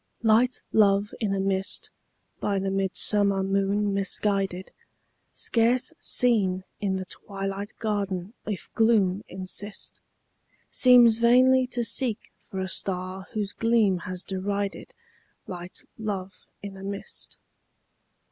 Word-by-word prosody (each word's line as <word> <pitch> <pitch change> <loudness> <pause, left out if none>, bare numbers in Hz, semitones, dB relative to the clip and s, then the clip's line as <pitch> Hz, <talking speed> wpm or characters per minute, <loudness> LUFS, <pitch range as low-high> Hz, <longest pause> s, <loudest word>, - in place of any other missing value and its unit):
Light 230 +3 +3
love 205 -1 +3
in 215 -4 -1
a 195 - 0
mist, 195 0 -1 0.5
by 200 -1 0
the 195 0 -1
midsummer 195 +1 +2
moon 200 +1 0
misguided, 195 -1 0 0.6
Scarce 235 +2 +1
seen 195 -7 +2 0.2
in 195 -2 -1
the 190 0 -4
twilight 195 +1 -5
garden 200 -3 -2
if 210 -4 -4
gloom 210 -4 +2
insist, 190 +2 -6 0.7
Seems 240 -3 +6
vainly 255 +2 +5
to 245 -1 -2
seek 235 -1 -1
for 190 -4 -8
a 190 - -2
star 185 0 -3
whose 210 -3 -2
gleam 225 -5 +2
has 185 +1 -6
derided 200 +1 -3 0.5
Light 175 0 -8
love 195 -3 -4 0.3
in 200 -1 -7
a 190 - -10
mist. 200 0 -6
200 Hz, 115 wpm, -26 LUFS, 190-220 Hz, 0.7 s, Seems